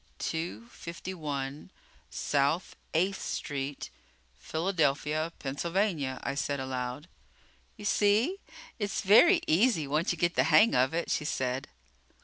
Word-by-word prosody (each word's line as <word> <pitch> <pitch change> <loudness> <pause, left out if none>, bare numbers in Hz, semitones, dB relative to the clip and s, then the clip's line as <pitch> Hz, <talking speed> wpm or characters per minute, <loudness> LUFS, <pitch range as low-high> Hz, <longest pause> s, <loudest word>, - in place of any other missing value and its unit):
"Two 165 +8 -4
fifty 170 -2 -7
one 145 -4 -5 0.4
South 145 +5 0 0.2
Eighth 190 +4 +1
Street, 140 -1 -4 0.5
Philadelphia, 155 - 0
Pennsylvania," 150 -1 -1
I - - -2
said 140 0 -2
aloud. 130 +2 -4 0.7
"You 210 - -9
see, 215 - +2 0.4
it's 205 -2 -1
very 335 - +6
easy 175 - +3
once 150 +5 0
you 175 - -3
get 170 +1 +1
the - - +2
hang 160 +8 +6
of 130 +4 +2
it," 170 - -1
she - - 0
said. 130 -2 -2
160 Hz, 125 wpm, -29 LUFS, 140-190 Hz, 0.7 s, very